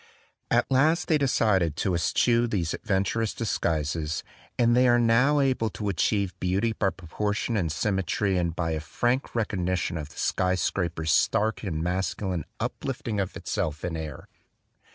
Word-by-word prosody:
At - - +2
last 155 +6 +3
they 155 -2 +3
decided 105 - +2
to 95 +3 0
eschew 115 +7 +2
these 90 -8 -1
adventi 95 -3 0
tious 115 -2 -1
disguises; 80 -6 -1 0.3
and 120 0 +4
they 125 +1 +5
are 120 0 +5
now 120 +5 +4
able 130 -5 +1
to 105 0 -4
achieve 100 +1 0
beauty 100 +5 0
by 100 -2 +1
proportion 105 +6 -3
and 85 -7 0
symmetry 95 +3 0
and 85 -2 0
by 85 -2 -1
a 80 - -1
frank 120 - -1
recognition 90 -6 -1
of 75 -1 -6
the - - -17
sky 90 0 +1
scraper's 85 -3 -1
stark 110 +7 +2
and 80 -6 -3
masculine 90 -1 -2
uplifting 120 -5 -3
of 95 -2 -2
itself 75 +1 -3
in 85 -2 -3
air. 80 -3 -6
95 Hz, 155 wpm, -26 LUFS, 85-115 Hz, 0.3 s, they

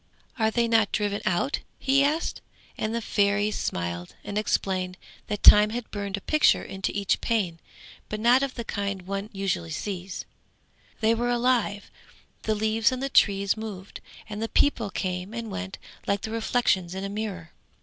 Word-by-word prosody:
'Are 220 -1 +3
they 235 +1 +1
not 225 -2 +3
driven 205 -1 0
out?' 190 +8 +1 0.2
he 275 +1 +3
asked, 305 +4 0 0.3
and 215 +1 -2
the 235 - -2
Fairy 205 0 +2
smiled, 85 - -3
and 205 0 -6
explained 185 -3 0 0.3
that 210 -1 -3
Time 210 0 +9
had 235 +1 -5
burned 200 -1 -3
a - - -8
picture 305 +8 +3
into 195 0 -3
each 200 -1 +1
pane, 190 -8 0 0.5
but 215 - -3
not 240 +4 +5
of 275 -2 -2
the 235 - -4
kind 200 -3 -3
one 195 +2 -4
usually 195 -4 -2
sees; 185 +3 -5 0.8
they 220 +1 +4
were 240 +1 0
alive, 240 -4 +1 0.5
the 220 - 0
leaves 220 +3 +2
on 255 - -3
the 275 +1 -2
trees 200 -5 +3
moved, 205 -3 -7 0.3
and 220 +1 -4
people 230 -7 +3
came 185 +2 -3
and 230 -2 -5
went 195 -1 -5 0.3
like 200 0 +1
the 220 - -5
reflections 220 -6 +1
in 190 - -4
a - - -2
mirror. 200 -5 -5
210 Hz, 170 wpm, -26 LUFS, 195-225 Hz, 0.8 s, Time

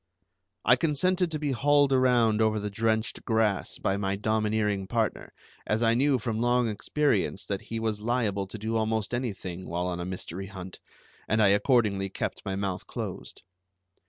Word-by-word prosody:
I 125 - +6
consented 175 +5 +1
to 155 - -2
be 150 -2 -1
hauled 145 +1 +3
around 120 -4 +3
over 110 -1 +2
the 105 0 -4
drenched 110 +1 -1
grass 110 -4 0
by 95 - 0
my 100 -1 -1
domineering 105 -1 0
partner, 110 +2 -1 0.4
as 110 +2 +1
I 115 0 +4
knew 135 +3 +3
from 115 -2 -3
long 120 0 +2
experience 110 -2 0
that 100 -2 -3
he 115 - -2
was 110 -2 -2
liable 105 -4 0
to 110 - -8
do 110 +2 -2
almost 110 0 -1
anything 95 -7 -4
while 85 +2 -1
on 90 -1 -2
a 85 - -3
mystery 95 +1 -5
hunt, 95 -1 -9 0.5
and 110 - +1
I 105 -2 +5
accordingly 100 -2 +2
kept - - -4
my 95 -1 -3
mouth 95 -2 -3
closed. - - -6
110 Hz, 170 wpm, -28 LUFS, 100-120 Hz, 0.5 s, I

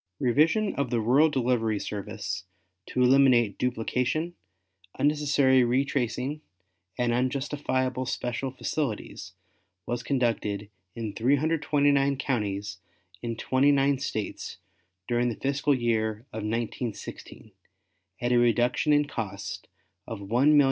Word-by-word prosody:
Revision 155 - +3
of 140 -3 0
the 120 -1 +1
rural 130 +8 +4
delivery 120 -6 +1
service 100 -3 -5 0.4
to 125 - +1
eliminate 125 -5 +4
duplication, 125 +7 -1 0.6
unnecessary 145 -3 +3
retracing 130 +2 0 0.6
and 120 -1 +1
unjustifiable 130 0 -1
special 125 +2 -2
facilities 130 -2 -4 0.5
was 120 0 -2
conducted 115 -6 -1 0.2
in 110 -3 -4
329 140 +1 +2
counties 100 -7 -2 0.4
in 115 -1 -3
twenty 130 +5 +2
nine 140 -1 +2
States 110 -6 -4 0.5
during 120 0 +1
the 115 - -3
fiscal 140 +1 +1
year 110 -2 -1
of 110 - -4
1916, 115 +1 -5 0.7
at 120 0 0
a 120 - +5
reduction 120 +4 +2
in 145 0 +4
cost 110 -8 -5 0.4
of 115 - -5
$1,359,162. 125 +9 +4
125 Hz, 105 wpm, -27 LUFS, 115-140 Hz, 0.7 s, a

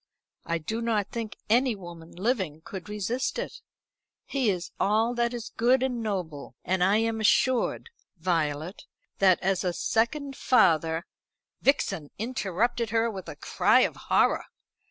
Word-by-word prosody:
I 170 0 0
do 220 +9 -4
not 220 -4 0
think 230 -2 -5
any 245 +2 +3
woman 170 -3 -11
living 190 - -1
could 190 +1 -8
resist 210 - -2
it. - - -5 0.6
He 265 -5 0
is 180 -2 -2
all 220 +4 +2
that 235 -1 0
is 240 -2 -6
good 250 +3 +3
and 250 -3 -1
noble, 180 -9 -4
and 185 0 +1
I 195 +3 +4
am 225 0 0
assured, 255 - +2 0.3
Violet, 165 0 -2 0.3
that 190 -2 +5
as 190 0 +1
a 180 -1 0
second 270 - 0
father 165 - +3 0.3
" - - -60
Vixen 170 - +1
interrupted 230 0 -1
her 230 +1 +1
with 190 -3 -7
a - - -7
cry - - +3
of - - +1
horror. - - +2
210 Hz, 150 wpm, -27 LUFS, 180-235 Hz, 0.6 s, that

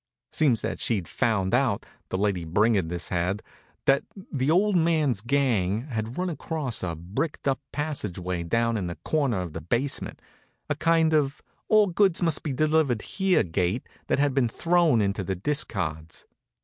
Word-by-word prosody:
Seems 130 -8 +2
that - - -3
she'd 100 -8 -1
found 110 -5 0
out, 125 -5 +2 0.2
the - - -1
lady 100 -3 0
brigandess 90 -1 +1
had, 90 +3 -1 0.4
that 135 0 +4 0.3
the 135 -1 0
old 195 +5 +3
man's 155 - +2
gang 115 -6 +1
had 110 +1 -3
run 185 +1 0
across 155 -7 -3
a 85 -3 -2
bricked 95 - -4
up 135 -1 +1
passageway 95 - -3
down 115 +7 +1
in 95 -4 -2
one 85 - -5
corner 140 -11 +1
of 85 -4 -6
the 80 - -5
basement, 120 - -2 0.5
a - - +2
kind 160 +1 +3
of 145 -3 +1 0.2
All 215 -1 +5
Goods 190 -1 +2
Must 165 -4 +2
Be 150 - -3
Delivered 150 -4 +2
Here 190 -2 +2
gate 90 +6 -1 0.2
that - - +2
had 140 -1 +2
been 130 -3 +2
thrown 170 -3 +3
into 100 0 0
the 95 +1 -2
discards. 90 - -3
120 Hz, 160 wpm, -26 LUFS, 95-155 Hz, 0.5 s, All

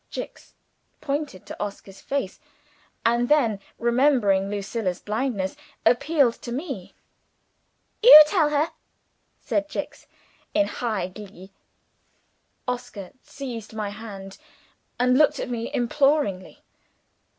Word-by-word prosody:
Jicks - - -8 0.4
pointed 280 - -4
to - - -5
Oscar's 200 -1 -8
face, 275 -9 -3 0.7
and 235 +1 +2
then, 240 -9 +3 0.2
remembering 235 -6 +2
Lucilla's 200 -2 -3
blindness, 210 -3 -2 0.3
appealed 275 +2 +3
to 240 - -7
me. 265 - -6 1.1
"You 435 -10 +12
tell 305 -1 +2
her!" 300 +2 +1 0.7
said 300 0 -2
Jicks, - - -6 0.5
in 305 -1 +4
high 215 -10 -3
glee. 190 -1 -12 1.2
Oscar 245 -6 -5
seized 235 -6 -8
my 210 -2 -3
hand, 200 -3 -9 0.6
and 250 +2 +3
looked 300 -1 +4
at - - -4
me 235 -1 -4
imploringly. 245 -6 0
235 Hz, 105 wpm, -24 LUFS, 200-280 Hz, 1.2 s, You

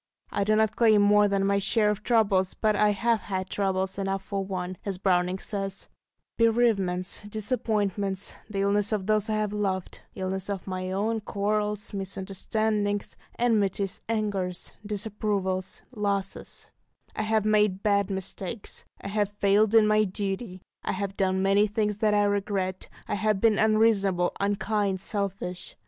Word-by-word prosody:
I 200 - 0
do 215 +2 +2
not 220 0 +2
claim 220 -3 +5
more 205 0 +5
than 195 -1 +1
my 200 0 +2
share 210 +1 +3
of 210 0 -4
troubles, 205 -5 +2
but 215 -1 +1
"I 210 +1 +4
have 225 +3 +1
had 190 -2 -4
trouble 190 -2 +1
enough 195 0 -2
for 195 0 -3
one," 185 -1 -4
as 195 -3 -3
Browning 180 -1 +1
says, 195 -1 -4 0.5
bereavements, 215 -6 +2
disappointments, 205 -3 -1 0.2
the 200 -2 -2
illness 205 +1 +2
of 205 -3 -1
those 215 0 +1
I 215 - +1
have 210 -1 -1
loved, 195 -3 -2
illness 190 +1 -3
of 200 -2 -3
my 185 -1 -4
own, 215 +4 0
quarrels, 210 0 -2
misunderstandings, 205 +2 -2 0.2
enmities, 205 -5 +1
angers, 200 -5 -2
disapprovals, 205 -3 -2
losses; 200 -4 -3 0.5
I - - -1
have 215 -1 +1
made 210 -2 +2
bad 200 -2 +2
mistakes, 195 +2 -5 0.2
I - - -5
have 205 0 0
failed 205 +1 +2
in 220 -1 +7
my 215 0 +4
duty, 195 -1 -4 0.2
I - - -2
have 200 -1 -3
done 190 -1 +1
many 200 +2 +4
things 210 -1 -1
that 210 -1 +3
I 205 - +4
regret, 200 -2 -1 0.2
I - - -2
have 210 0 +1
been 220 0 +3
unreasonable, 210 -5 +3
unkind, 200 -1 0
selfish. 195 -2 -3
200 Hz, 150 wpm, -27 LUFS, 190-215 Hz, 0.5 s, in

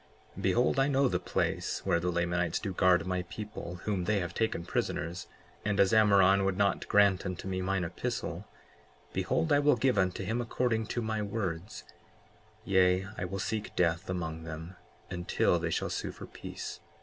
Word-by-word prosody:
55:3 - - -7
Behold, 125 +3 +2
I 135 - +4
know 140 -1 +3
the 90 -5 0
place 90 - -2
where 85 - +3
the 90 +1 -1
Lamanites 85 0 0
do 100 -3 -3
guard 90 -1 +4
my 90 0 -1
people 105 -2 -7
whom 100 -4 -1
they 110 +2 +2
have 85 -2 -4
taken 110 -6 -1
prisoners; 85 +1 -2 0.4
and 105 -1 0
as 100 +2 +4
Ammoron 100 -3 +5
would 95 -1 0
not 100 -1 +1
grant 100 -2 +4
unto 90 +1 -5
me 95 -1 -2
mine 95 0 0
epistle, 85 - -4 0.7
behold, 150 - +1
I 145 - +5
will 145 -1 +4
give 125 -2 +2
unto 95 0 0
him 110 +5 -1
according 115 -2 0
to 120 - -2
my 110 -1 -1
words; 100 -2 -4 0.8
yea, 95 0 +3
I - - -3
will 95 +2 -4
seek 110 +2 -3
death 85 +1 +1
among 80 -3 -3
them 80 +2 -7 0.4
until 85 -1 +1
they 80 0 -2
shall - - -1
sue - - -3
for - - -10
peace. - - -7
95 Hz, 180 wpm, -30 LUFS, 90-110 Hz, 0.8 s, Ammoron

